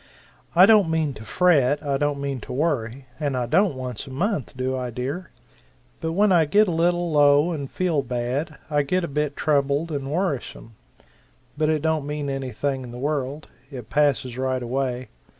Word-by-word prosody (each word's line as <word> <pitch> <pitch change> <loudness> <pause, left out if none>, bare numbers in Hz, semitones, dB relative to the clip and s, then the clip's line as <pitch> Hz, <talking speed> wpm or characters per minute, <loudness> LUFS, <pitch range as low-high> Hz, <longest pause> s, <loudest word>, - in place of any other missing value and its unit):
I 180 +2 +9
don't 205 -5 +5
mean 160 -3 0
to 110 - -10
fret, 145 -1 +2
I 140 -1 +1
don't 145 0 0
mean 140 -2 -3
to - - -9
worry; 135 -3 -1
and 145 -4 -1
I 125 - 0
don't, 190 - +2
once 125 -3 -6
a - - -8
month, 150 - -2
do 130 +1 -1
I, 125 -1 -3
dear? 135 +9 -4 0.7
But 160 0 -3
when 205 +3 +3
I 170 -3 +5
get 205 +7 +4
a - - 0
little 175 +1 +1
low 145 +2 +5
and 140 -5 -4
feel 175 -6 0
bad, 130 +5 -3
I 145 -1 +1
get 180 +6 0
a - - -1
bit 150 0 -2
troubled 145 +2 +1
and 140 -2 -3
worrisome, 150 -9 -3 0.8
but 155 0 +1
it 155 -1 0
don't 160 -3 0
mean 145 -1 -3
anything 135 0 -2
in 125 - -8
the 120 - -8
world. 145 +1 -3 0.2
It 125 -6 -9
passes 140 -4 +1
right 130 -1 -1
away. 125 0 -2
145 Hz, 185 wpm, -24 LUFS, 130-160 Hz, 0.8 s, I